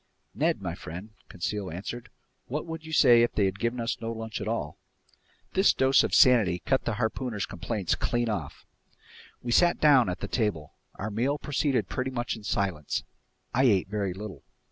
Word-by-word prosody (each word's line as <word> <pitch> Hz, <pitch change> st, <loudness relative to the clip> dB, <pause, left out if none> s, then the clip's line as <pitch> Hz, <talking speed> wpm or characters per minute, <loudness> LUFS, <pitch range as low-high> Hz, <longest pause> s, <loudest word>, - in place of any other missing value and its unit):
"Ned -, -, 0 dB
my -, -, -2 dB
friend," 90 Hz, +7 st, -8 dB, 0.2 s
Conseil 95 Hz, +2 st, -3 dB
answered, 115 Hz, +8 st, -6 dB, 0.4 s
"what 150 Hz, +4 st, -3 dB
would 165 Hz, -1 st, -6 dB
you 160 Hz, -, -9 dB
say 120 Hz, -6 st, +6 dB
if 120 Hz, -, +2 dB
they'd 95 Hz, -1 st, 0 dB
given 115 Hz, +2 st, -1 dB
us 115 Hz, 0 st, -2 dB
no 115 Hz, 0 st, -3 dB
lunch 110 Hz, -1 st, -5 dB
at -, -, -4 dB
all?" -, -, -3 dB, 0.7 s
This 190 Hz, +2 st, +4 dB
dose 130 Hz, 0 st, +4 dB
of -, -, 0 dB
sanity 110 Hz, -9 st, +5 dB
cut 135 Hz, -, +1 dB
the 120 Hz, -, 0 dB
harpooner's 110 Hz, -1 st, -2 dB
complaints 100 Hz, 0 st, -2 dB
clean 120 Hz, 0 st, 0 dB
off. 85 Hz, -10 st, -4 dB, 0.8 s
We 120 Hz, -, -3 dB
sat 175 Hz, +7 st, +4 dB
down 135 Hz, -8 st, +5 dB
at 90 Hz, 0 st, -3 dB
the -, -, -4 dB
table. 105 Hz, -, -2 dB, 0.2 s
Our 105 Hz, +2 st, -4 dB
meal 125 Hz, +7 st, 0 dB
proceeded 145 Hz, -2 st, 0 dB
pretty 130 Hz, 0 st, -2 dB
much 120 Hz, -2 st, -2 dB
in 110 Hz, -, -11 dB
silence. 95 Hz, -8 st, -1 dB, 0.5 s
I 130 Hz, +2 st, +3 dB
ate 100 Hz, -6 st, +3 dB
very 100 Hz, -3 st, -2 dB
little. 95 Hz, -7 st, -8 dB
115 Hz, 180 wpm, -28 LUFS, 100-130 Hz, 0.8 s, say